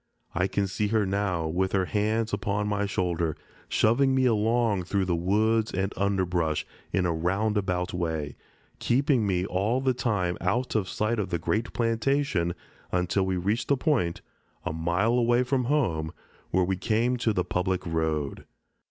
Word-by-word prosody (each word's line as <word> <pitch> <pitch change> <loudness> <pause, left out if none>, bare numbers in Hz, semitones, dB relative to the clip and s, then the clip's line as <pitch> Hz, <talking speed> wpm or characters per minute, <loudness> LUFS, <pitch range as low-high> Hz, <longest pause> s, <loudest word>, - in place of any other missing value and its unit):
I 90 +2 +1
can 100 0 0
see 100 +2 -1
her 105 0 +2
now 95 -4 -1
with 95 +4 -1
her 95 -2 +2
hands 110 +5 0
upon 100 +1 -1
my 100 0 0
shoulder, 85 -4 -1 0.3
shoving 130 +5 +3
me 130 -1 +3
along 110 -4 +2
through 95 +1 0
the 90 -2 +1
woods 110 +6 +1
and 95 +2 -1
underbrush, 90 -5 0 0.3
in 95 -2 +1
a 85 - +1
roundabout 95 +1 0
way, 80 -5 -2 0.4
keeping 130 -3 +2
me 90 -1 +1
all 100 +7 0
the 130 -1 +1
time 105 -8 -1
out 115 +8 0
of 105 -4 0
sight 110 +2 -1
of 100 - -2
the 85 - 0
great 105 +7 -1
plantation 115 -6 0 0.4
until 90 +2 +1
we 95 -1 0
reached 100 +7 -1
the 140 - +3
point, 125 - 0 0.4
a - - -2
mile 85 +8 +1
away 120 0 +3
from 125 0 0
home, 90 - 0 0.4
where 95 0 +2
we 95 +1 -1
came 115 +6 +1
to 115 -2 +1
the 90 -3 0
public 90 +1 -1
road. 80 -4 -2
100 Hz, 165 wpm, -27 LUFS, 90-115 Hz, 0.4 s, shoving